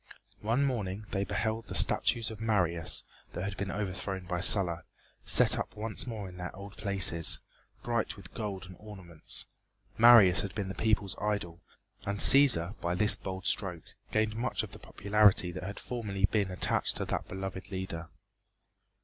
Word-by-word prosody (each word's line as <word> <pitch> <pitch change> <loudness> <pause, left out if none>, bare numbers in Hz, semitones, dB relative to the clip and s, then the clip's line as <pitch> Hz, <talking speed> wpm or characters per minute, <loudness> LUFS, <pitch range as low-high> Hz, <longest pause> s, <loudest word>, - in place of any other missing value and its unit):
One 115 +7 0
morning 105 -6 -3
they 100 - -1
beheld 110 +1 -3
the - - -7
statues 115 -1 +2
of 110 0 -10
Marius, 90 -7 0 0.3
that 90 - -5
had 100 0 -4
been 100 +1 -5
overthrown 95 -2 -5
by 90 0 -3
Sulla, 90 -2 +7 0.5
set - - +5
up - - -6
once 110 +3 -3
more 110 -5 -6
in 90 -1 -12
their 90 0 -7
old 100 +1 -11
places, 95 -5 +1 0.4
bright 115 -3 -2
with 95 -3 -13
gold 100 -4 -6
and 90 0 -12
ornaments. 95 -7 -6 0.5
Marius 110 -6 +7
had 100 0 -7
been 100 -3 -4
the - - -5
people's 105 0 -1
idol, 100 -5 -3 0.4
and 100 +1 -3
Cæsar 115 -8 +5
by 85 +1 -2
this 105 +3 +6
bold 95 -1 -7
stroke 90 -5 +1 0.3
gained 110 0 0
much 120 +3 -2
of - - -9
the - - -12
popularity 100 -3 +2
that 95 +1 -7
had 100 +3 -7
formerly 105 -5 -2
been 100 -2 -1
attached 90 - -1
to - - -3
that - - -4
beloved 95 0 -7
leader. 95 -4 -6
100 Hz, 165 wpm, -29 LUFS, 90-110 Hz, 0.5 s, Sulla